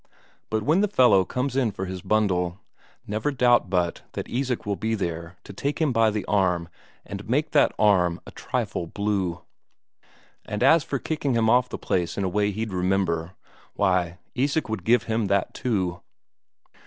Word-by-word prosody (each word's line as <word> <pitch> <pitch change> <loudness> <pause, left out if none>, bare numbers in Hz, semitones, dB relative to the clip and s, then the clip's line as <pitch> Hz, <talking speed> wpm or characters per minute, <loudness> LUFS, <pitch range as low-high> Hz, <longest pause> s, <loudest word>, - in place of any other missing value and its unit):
But 110 -1 -1
when 160 - +3
the 210 - +3
fellow 120 - +5
comes 125 +6 -3 0.2
for 95 - -3
his 95 0 -6
bundle, 90 -4 0 0.5
never 110 +8 -1
doubt 125 -2 +3
but 90 -3 0
that - - -5
Isak 125 0 -2
will 100 -1 -1
be 110 +3 -1
there 85 -3 -4
to - - -10
take 140 +8 -2
him 155 -5 +2
by 115 -1 +4
the 105 -1 -3
arm 90 -5 +1 0.4
and 100 +2 -8
make 145 +6 +1
that 145 - +4
arm 90 -5 +3
a - - -10
trifle 85 - -3
blue. 100 -3 -2 1.0
And 105 -1 -3
as 165 -2 +6
for 140 - -2
kicking 145 -2 -2
him 110 -1 +3
off 125 +1 +3
the - - -5
place 90 -2 -1
in 100 - 0
a 95 - 0
way 105 +2 +1
he'd 110 0 -4
remember 90 -2 0 0.4
why, 90 -3 +1 0.2
Isak 140 +2 0
would 105 -5 -4
give 120 -1 +4
him 110 -2 -1
that 100 -1 0
too! 95 -8 -1
105 Hz, 175 wpm, -25 LUFS, 90-120 Hz, 1.0 s, as